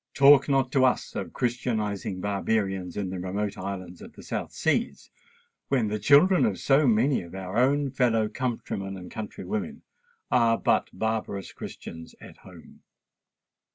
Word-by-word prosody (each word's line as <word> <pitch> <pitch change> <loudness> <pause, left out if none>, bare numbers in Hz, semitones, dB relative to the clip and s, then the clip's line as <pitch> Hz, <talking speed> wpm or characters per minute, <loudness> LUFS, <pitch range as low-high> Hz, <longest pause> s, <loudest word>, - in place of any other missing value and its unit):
Talk 140 +1 +6
not 135 -2 +2
to 135 -2 +3
us 130 - +1
of - - -4
christianizing 105 -6 -2
Barbarians 100 -2 -1
in 95 -3 -2
the 95 - -4
remote 100 +3 -3
islands 95 -2 -6
of - - -11
the - - -13
South - - -4
Seas, - - -1 0.6
when 125 -6 +1
the 105 +1 -2
children 150 - +5
of 100 -3 +1
so 135 - +3
many 120 +4 +3
of 85 +1 -11
our 95 0 -6
own 140 +2 +2
fellow 120 -4 +2
countrymen 105 -5 -4
and 90 -1 -10
country 105 -3 -7
women 95 -2 -4 0.5
are 115 -2 +4
but - - +1
barbarous 105 -2 -3
Christians 80 0 -9
at - - -13
home! - - -16
110 Hz, 155 wpm, -26 LUFS, 95-130 Hz, 0.6 s, Talk